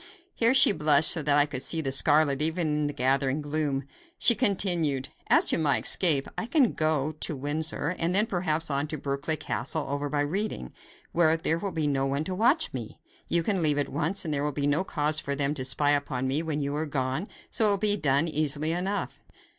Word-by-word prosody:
Here 235 +3 +2
she 265 - +6
blushed 150 -3 +3
so 160 - 0
that 145 -1 +2
I 145 - +4
could 140 -3 -5
see 165 - +2
the 135 -4 -2
scarlet 145 0 +3
even 160 +2 +1
in 150 0 -1
the - - -3
gathering 135 +2 0
gloom. 145 -2 -2 0.3
She 235 - +5
continued: 175 - 0 0.2
"As - - +4
to - - +2
my 145 -4 +2
escape, 150 -7 +3
I 225 - -4
can 275 -5 +2
go 155 -2 -1
to 155 - -1
Windsor, 145 +2 -2
and 170 +2 0
then 210 +2 +4
perhaps 165 -7 -2
on 140 +2 -1
to 155 0 -5
Berkeley 140 +3 -2
Castle, 150 +3 -3
over 145 +1 -3
by 145 0 -1
Reading, 155 - -3 0.4
where 165 -1 +2
there 165 0 -1
will 195 +2 -4
be 160 -3 -2
no 135 -2 0
one 140 +2 -2
to 185 - -5
watch 245 - +1
me. 120 -4 -7 0.3
You 170 0 +1
can 195 0 -1
leave 150 -2 +2
at 145 - -1
once, 165 +7 -1
and 155 - -2
there 140 0 -1
will 150 - -1
be 140 0 -3
no 145 +5 +1
cause 155 -3 0
for 140 -2 -4
them 140 +1 -1
to 135 -4 -5
spy 145 +3 +1
upon 135 -3 -1
me 140 +4 -1
when 155 -2 -3
you 140 +1 -3
are 155 +1 -2
gone, 135 +5 -3 0.2
so 215 -2 +2
it - - 0
can - - -13
be 210 -1 +4
done 145 -1 +1
easily 155 0 0
enough. 190 +4 -3
150 Hz, 225 wpm, -26 LUFS, 140-165 Hz, 0.4 s, she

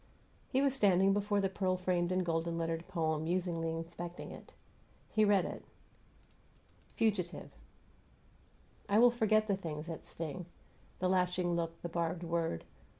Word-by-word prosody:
He 265 +1 +2
was 275 -2 +3
standing 195 -6 +4
before 205 0 +1
the 195 - +2
pearl 185 -1 0
framed 180 -1 0
and 185 0 +1
golden 165 0 0
lettered 165 0 -2
poem, 160 -4 0
musingly 170 -1 0
inspecting 170 +1 -6
it. - - -11 0.6
He 215 - +3
read 205 -3 +4
it: - - -6 1.3
FUGITIVE 195 -6 0 1.4
I 200 - +4
will 240 +2 +7
forget 215 -2 +3
the 200 - +2
things 155 -5 -5
that 165 -1 -6
sting: 165 +2 -6 0.5
The 185 - 0
lashing 180 -1 +1
look, 165 -1 -2
the - - -1
barbed 170 +1 -1
word. 165 - -1
180 Hz, 145 wpm, -34 LUFS, 165-195 Hz, 1.4 s, will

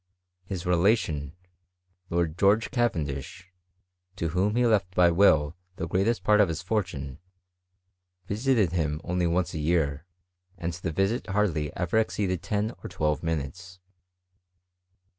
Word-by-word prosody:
His 95 -1 -5
relation, 85 - +1 0.7
Lord 85 -2 0
George 100 +5 +3
Ca 120 -2 +3
vendish, 75 +1 -6 0.7
to 85 -4 -2
whom 95 +6 0
he 125 0 +3
left 100 -5 +1
by 90 -1 +5
will 80 -4 +4 0.2
the 85 - -4
greatest 95 +4 0
part 105 0 +5
of 100 - +3
his 80 +1 -4
fortune, 90 - -3 1.1
visited 110 - +1
him 75 -4 -1
only 90 0 0
once 85 +1 0
a 80 - -3
year, 75 -1 0 0.5
and 85 0 -3
the 85 +1 -4
visit 95 +8 0
hardly 95 -7 0
ever 90 +4 +1
exceeded 95 -5 -1
ten 105 +2 -1
or - - -6
twelve 75 -1 -1
minutes. 85 +3 -4
90 Hz, 135 wpm, -27 LUFS, 80-100 Hz, 1.1 s, by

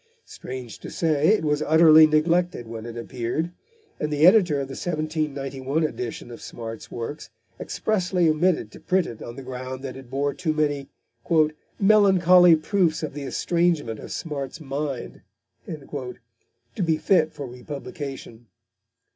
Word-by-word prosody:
Strange 125 -3 -8
to - - -8
say, 155 -2 +1
it 210 -4 +3
was 150 0 +1
utterly 160 0 +7
neglected 165 -2 +1
when 115 0 -7
it 120 0 -7
appeared, 125 +8 -3 0.5
and 150 - -2
the 150 +1 +3
editor 180 -5 +6
of 135 - -3
the - - -10
1791 150 -2 -2
edition 120 -5 -4
of 115 - -10
Smart's 115 -1 -8
works 120 +3 -6 0.3
expressly 185 -5 0
omitted 155 - +1
to - - -12
print 185 -1 +1
it 115 - -8
on 120 - -7
the 135 - -8
ground 130 +1 -6
that 130 -2 -5
it 135 -2 -11
bore 140 +2 -1
too 165 -4 -1
many 145 -2 -1 0.9
"melancholy 185 -4 +6
proofs 165 0 0
of 155 - -4
the 145 - -6
estrangement 160 -6 0
of - - -9
Smart's 145 -3 -5
mind" 140 -3 -5 0.5
to 130 - -8
be 160 -2 +2
fit 165 -2 +2
for 140 - -7
republication. 130 -2 -8
150 Hz, 145 wpm, -24 LUFS, 130-165 Hz, 0.9 s, utterly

